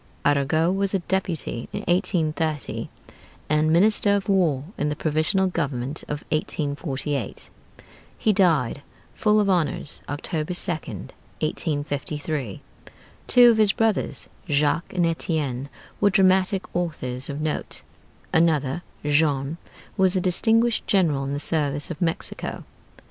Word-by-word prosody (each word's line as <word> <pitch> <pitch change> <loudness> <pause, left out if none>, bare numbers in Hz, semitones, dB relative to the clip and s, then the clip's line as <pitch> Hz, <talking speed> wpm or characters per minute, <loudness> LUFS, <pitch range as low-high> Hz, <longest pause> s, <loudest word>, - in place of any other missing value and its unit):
Arago 145 +4 +3
was 195 +1 0
a - - +2
Deputy 175 -10 -2
in - - -4
1830, 160 -4 -1 0.6
and 155 +1 +3
Minister 205 +3 +4
of 195 -2 -2
War 170 -9 +2
in 150 - -1
the 150 - -2
Provisional 155 +6 +1
Government 145 -6 -2
of 150 0 -5
1848. 145 -3 -2 0.7
He 215 - +2
died 160 - +2 0.3
full 215 0 +3
of 205 - +2
honors, 170 -7 0
October 155 +3 -3
2d, 175 -2 -4 0.3
1853. 145 - -3 0.6
Two 245 -1 +7
of 225 - +1
his 210 -2 +4
brothers, 225 -3 0 0.2
Jacques 145 +3 +1
and 180 -2 +1
Étienne, 150 -6 -1 0.3
were 205 - +4
dramatic 190 0 +3
authors 135 -7 -2
of 140 +1 -4
note. 155 0 -3 0.5
Another, 160 -2 +2 0.2
Jean, 145 0 +1 0.4
was 190 -1 +4
a - - +3
distinguished 225 +6 +2
general 160 -9 +2
in 140 - -3
the 145 - -2
service 145 -1 0
of 170 - -7
Mexico. 165 -2 -2
160 Hz, 120 wpm, -24 LUFS, 145-185 Hz, 0.7 s, Two